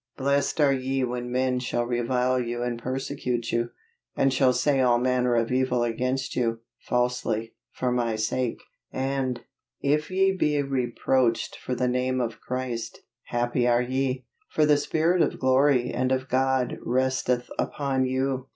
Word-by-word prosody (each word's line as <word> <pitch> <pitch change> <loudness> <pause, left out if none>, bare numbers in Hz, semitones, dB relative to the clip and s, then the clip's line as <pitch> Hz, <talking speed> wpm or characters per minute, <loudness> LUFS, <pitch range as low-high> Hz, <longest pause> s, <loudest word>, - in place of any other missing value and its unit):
"Blessed 140 +2 +1
are 140 -2 +5
ye 135 0 -1
when 125 0 -3
men 130 0 +1
shall 120 -1 -1
revile 125 +1 +1
you 120 0 -2
and 120 -1 -2
persecute 130 -2 -3
you, 120 0 0 0.5
and 135 -1 +2
shall 130 -1 +4
say 135 +2 +2
all 120 -2 +4
manner 125 0 +1
of 115 0 +1
evil 125 -1 +1
against 125 +3 -1
you, 115 -2 0 0.2
falsely, 120 -2 -1 0.2
for 125 -1 -1
my 120 -2 0
sake;" 115 +3 -2 0.3
and, 130 -2 -2 0.4
"If 150 +2 +1
ye 190 +1 +2
be 150 -5 +1
reproached 130 -2 0
for 125 - -4
the 125 +1 0
name 130 +1 0
of 115 -2 -3
Christ, 125 -2 -4 0.2
happy 120 0 0
are 120 0 +3
ye; 130 0 -1 0.2
for 155 - +2
the 150 -1 +5
spirit 165 +4 +1
of - - +1
glory 130 -1 +3
and 130 +1 0
of 130 0 0
God 130 0 +1
resteth 130 0 0
upon 135 -2 0
you." 130 0 -1
130 Hz, 155 wpm, -26 LUFS, 120-135 Hz, 0.5 s, are